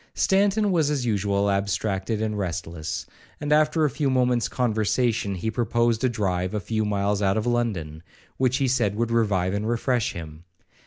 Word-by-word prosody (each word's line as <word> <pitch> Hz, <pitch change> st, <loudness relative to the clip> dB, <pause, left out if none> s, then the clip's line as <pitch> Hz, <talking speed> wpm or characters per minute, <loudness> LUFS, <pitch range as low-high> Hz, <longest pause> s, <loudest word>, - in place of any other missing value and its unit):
Stanton 200 Hz, +1 st, +2 dB
was 160 Hz, -5 st, +2 dB
as 140 Hz, -4 st, -1 dB
usual 100 Hz, -2 st, +1 dB
abstracted 100 Hz, +2 st, -1 dB
and 110 Hz, -1 st, -2 dB
restless, 85 Hz, -4 st, -4 dB, 0.3 s
and, 145 Hz, 0 st, 0 dB
after 155 Hz, +1 st, +3 dB
a -, -, +2 dB
few 145 Hz, 0 st, 0 dB
moments 125 Hz, -3 st, +2 dB
conversation, 110 Hz, -2 st, 0 dB
he 110 Hz, +5 st, -2 dB
proposed 115 Hz, 0 st, +1 dB
a 130 Hz, -, +3 dB
drive 95 Hz, -4 st, -1 dB
a -, -, 0 dB
few 110 Hz, +3 st, -2 dB
miles 100 Hz, 0 st, 0 dB
out 100 Hz, +1 st, +2 dB
of 110 Hz, -, -1 dB
London, 100 Hz, -11 st, -1 dB, 0.4 s
which 130 Hz, -1 st, +2 dB
he 135 Hz, -2 st, +1 dB
said 115 Hz, -6 st, +1 dB
would 115 Hz, +1 st, -1 dB
revive 100 Hz, -5 st, +1 dB
and 105 Hz, +2 st, -2 dB
refresh 120 Hz, -1 st, 0 dB
him. 80 Hz, -1 st, -9 dB
110 Hz, 170 wpm, -24 LUFS, 100-125 Hz, 0.4 s, after